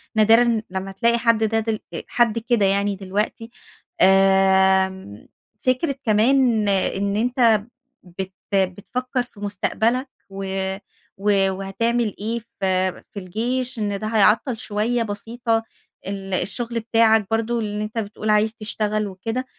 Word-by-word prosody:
نادرًا 225 +1 +4
لمّا 190 +1 -4
تلاقي 235 +4 +2
حد 230 -2 +2
ده 225 +1 +1
دل 220 -1 -2
آآ - - -5
حد 235 -2 +2
كده 230 -3 +1
يعني 200 +1 +1
دلوقتي. 205 +4 -3 0.5
آمم، 190 - +3 0.4
فكرة 260 +3 +1
كمان 225 0 +3
إن 200 +1 0
أنت 230 -2 +3 0.4
بت 190 +1 -7 0.2
بتفكر 210 +7 -1
في 240 -4 -19
مستقبلك 225 +6 -1 0.2
و 195 0 -6 0.7
و 195 -1 +2
وهتعمل 210 +4 -1
إيه 225 +3 -2 0.2
في 185 -1 +1 0.2
في 200 - -5
الجيش 240 +6 -3
إن 205 -2 -2
ده 215 - -4
هيعطَّل 225 +3 +3
شوية 220 +3 -1
بسيطة، 225 +2 -2 0.4
ال 195 -1 -5
الشغل 230 +5 -2
بتاعك 225 -2 +3
برضه 230 +1 0
اللي 210 -1 -3
أنت 215 +2 -7
بتقول 215 0 -3
عايز 215 +1 +3
تشتغل 215 -1 -2
وكده. 225 +7 -4
215 Hz, 130 wpm, -22 LUFS, 195-230 Hz, 0.7 s, نادرًا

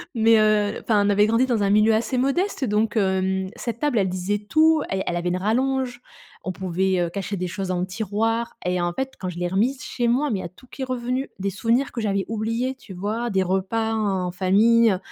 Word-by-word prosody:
mais 225 0 +5
heu, 210 -1 +2
enfin, 210 -3 +2
on 205 - +2
avait 205 +1 +4
grandi 230 +3 +3
dans 235 -4 0
un 200 - +2
milieu 215 +2 +4
assez 230 +3 0
modeste, 275 +4 0
donc 210 +1 0
hem, 190 -1 +1
cette 235 -1 -5
table, 290 -7 +1
elle 190 -1 +1
disait 185 +3 -2
tout. 310 +8 +3
Elle 190 0 -1
elle 175 - -2
avait 175 +1 -1
une 180 - 0
rallonge. 245 +4 0 0.4
On 185 - -3
pouvait, 185 0 -1
heu, 170 -1 0
cacher 200 +1 -4
des 180 - -2
choses 190 +2 -4
dans 180 -1 -1
le 180 - 0
tiroir 225 +4 -2
et 180 0 0
en 175 0 0
fait, 265 +3 -3
quand 185 - -4
je 175 - -8
l'ai 175 - -1
remise 240 +8 0
chez 240 -2 -2
moi 270 +5 +2
mais 200 - -1
il - - -4
y - - -6
a - - -6
tout 190 - -19
qui 270 - -10
est - - 0
revenu. 255 +1 -2
Des 195 +1 -2
souvenirs 235 +6 0
que 235 - -4
j'avais 200 -3 0
oubliés, 230 +4 -1
tu 230 -7 -12
vois? 215 +6 -3
Des 190 -2 +1
repas 195 +5 -1
en 190 -5 -1
famille, 210 +4 +4
215 Hz, 240 wpm, -23 LUFS, 190-235 Hz, 0.4 s, mais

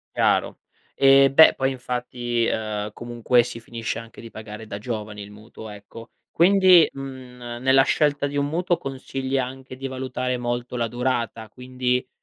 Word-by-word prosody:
Chiaro. - - +1 0.3
Eh 135 0 +5
beh 160 +3 +7
poi 135 0 0
infatti, 125 -2 -3
ehm, 105 -2 -2
comunque 120 +1 +1
si 120 -1 -6
finisce 115 -1 -5
anche 115 -1 -10
di 115 - -10
pagare 110 0 -10
da 100 - -6
giovani 105 -2 -6
il 100 - -12
mutuo, 110 +1 -12
ecco. 105 +3 -12 0.2
Quindi, 185 -1 +6
mhmm, 125 -3 -8
nella 130 +1 +5
scelta 145 0 +1
di 145 0 -4
un 140 - +1
mutuo 175 +3 0
consigli 135 0 -4
anche 130 0 -6
di 135 +1 -5
valutare 130 -1 -3
molto 120 0 -4
la 115 -1 -1
durata. 120 -2 -3
Quindi 125 +1 -2
125 Hz, 155 wpm, -23 LUFS, 115-135 Hz, 0.3 s, beh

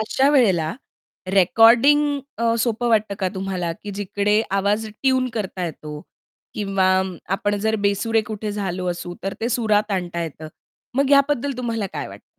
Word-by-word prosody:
अशा 265 +5 +2
वेळेला 190 - +3 0.6
रेकॉर्डिंग 245 +9 +5 0.2
अ, 230 0 +2
सोपं 235 +1 0
वाटतं 215 -3 +2
का 190 - +1
तुम्हाला, 190 -3 -3
की 205 - -6
जिकडे 205 +1 0
आवाज 200 +3 +1
ट्यून 260 +4 0
करता 190 -4 -3
येतो 150 -2 -7 0.5
किंवा 195 -2 0 0.5
आपण 205 +1 0
जर 220 +1 +1
बेसुरे 205 +2 +1
कुठे 210 -1 -4
झालो 185 -3 -3
असू, 175 0 -6
तर 195 0 -3
ते 230 - 0
सुरात 215 -3 +1
आणता 175 -2 -2
येतं. 160 -1 -7 0.5
मग 275 +1 +1
याबद्दल 280 -1 +3
तुम्हाला 230 -4 -2
काय - - -3
वाटतं? - - -13
210 Hz, 150 wpm, -22 LUFS, 190-235 Hz, 0.6 s, रेकॉर्डिंग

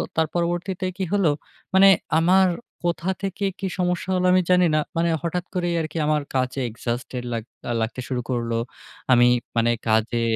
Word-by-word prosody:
তার 160 0 +2
পরবর্তীতে 175 +2 -1
কি 195 - -2
হলো? 200 -5 +3 0.4
মানে 190 +1 +7 0.3
আমার 185 +3 +5 0.4
কোথা 170 +1 -1
থেকে 195 +1 -2
কি 195 - -2
সমস্যা 180 +1 -1
হলো 180 0 +1
আমি 185 - +5
জানি 180 0 +5
না, - - +4 0.2
মানে 170 +1 +2
হঠাৎ 175 +1 -2
করেই 175 -2 0
আরকি 155 +1 -5
আমার 150 0 +2
কাজে 130 +1 0
exhausted 120 +2 -4
লাগ 115 -2 -2 0.4
লাগতে 115 +3 -3
শুরু 125 -1 -2
করলো। 120 -2 -1 0.6
আমি 120 -1 +6 0.3
মানে 115 0 +3 0.2
কাজে 110 +2 +2
165 Hz, 160 wpm, -23 LUFS, 125-180 Hz, 0.6 s, মানে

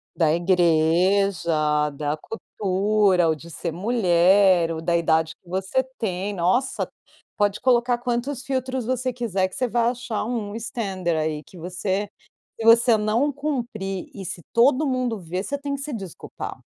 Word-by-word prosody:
Da 160 -3 +3
igreja, 170 -2 +2
da 145 +1 -2
cultura, 195 -1 +1
ou 160 - +3
de 165 +2 -11
ser 170 +1 -4
mulher, 185 -3 +3
ou 160 - -3
da 170 +1 0
idade 160 -1 +2
que 175 - -23
você 190 +8 0 0.2
tem. 200 -1 -2
Nossa, 190 +10 0 0.5
pode 205 -1 +1
colocar 245 -1 +2
quantos 245 +2 -2
filtros 260 -2 -2
você 255 0 -1
quiser 215 -6 -1
que 185 - -12
você 255 - 0
vai 235 0 +2
achar 245 -3 -3
um 220 -3 -3
standard, 195 -7 -2
aí, 155 -1 -2
que 180 - -16
você 185 +4 -2 0.5
se - - -3
você 230 0 +6
não 220 +7 +1
cumprir, 240 -10 -4
e 195 - -8
se 170 -1 -6
todo 260 +5 +4
mundo 255 -4 -1
ver, 180 +2 -4
você 285 +4 -3
tem 280 0 -4
que 275 - -6
se 295 - -5
desculpar. 195 -7 -7
200 Hz, 155 wpm, -23 LUFS, 175-240 Hz, 0.5 s, você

